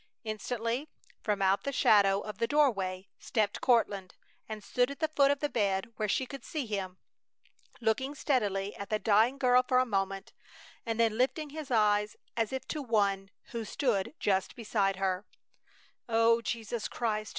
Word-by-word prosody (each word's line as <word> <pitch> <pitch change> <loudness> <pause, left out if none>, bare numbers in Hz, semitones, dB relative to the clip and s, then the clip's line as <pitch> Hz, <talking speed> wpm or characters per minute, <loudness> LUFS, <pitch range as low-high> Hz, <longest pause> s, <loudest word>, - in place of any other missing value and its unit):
Instantly, 230 +5 -3 0.3
from 205 -2 0
out 195 +1 +3
the 280 - -2
shadow 200 -6 +4
of 210 - -8
the 230 - +1
doorway, 200 -11 +1
stepped 210 -3 -1
Courtland, 205 -6 +1 0.3
and 215 -1 -6
stood 245 +4 +1
at 280 - -7
the 315 - +1
foot 285 -3 +3
of 285 -1 +1
the 295 - +1
bed 205 -3 0
where 215 -1 -1
she 260 - +1
could 270 0 -9
see 300 -5 -3
him, 195 -4 -4 0.8
looking 260 +6 0
steadily 205 -9 0
at 200 - -7
the 215 - +1
dying 220 +5 +3
girl 250 -2 +5
for 255 0 +1
a 255 - +4
moment, 195 -3 -2 0.5
and 225 0 -2
then 225 -1 +2
lifting 290 +3 0
his 305 -1 -7
eyes, 210 -3 +2 0.2
as 225 -2 0
if 265 -1 -4
to 305 - -3
One 200 -6 +1 0.2
who 235 -1 -3
stood 225 +1 -1
just 190 -2 0
beside 205 -4 0
her: 190 0 -1 0.9
"O 230 +1 +4
Jesus 230 -1 -3
Christ! 215 -2 -2
220 Hz, 170 wpm, -30 LUFS, 200-255 Hz, 0.9 s, girl